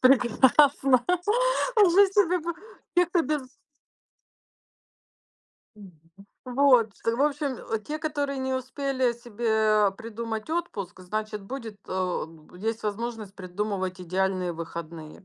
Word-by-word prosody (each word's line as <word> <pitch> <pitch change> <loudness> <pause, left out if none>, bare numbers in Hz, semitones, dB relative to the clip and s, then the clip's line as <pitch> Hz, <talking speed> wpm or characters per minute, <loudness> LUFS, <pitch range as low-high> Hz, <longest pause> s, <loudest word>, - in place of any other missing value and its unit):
прекрасно 260 +1 +4 0.8
жить 390 +2 +5
себе 365 -3 +3
по 340 +2 -3 0.4
те 355 -1 +4
кто 350 -1 +1
без. 290 -4 -3 2.3
Мгм, 200 -3 -12 0.5
вот, 250 -3 +4 0.2
э. 230 - +2
В 265 - +1
общем, 285 -3 0 0.2
э, 225 - +2
те, 300 +8 -5
которые 290 -3 -2
не 265 0 -2
успели 260 -1 -1
себе 220 -3 +1
придумать 225 +2 -5
отпуск, 210 - -4
значит, 210 +2 -4
будет, 225 -2 -7
а, 185 -3 -1
б 160 +2 -16
есть 225 +2 -2
возможность 215 -1 -4
придумывать 185 0 -3
идеальные 185 0 -1
выходные. 165 0 -8
230 Hz, 115 wpm, -26 LUFS, 195-275 Hz, 2.3 s, жить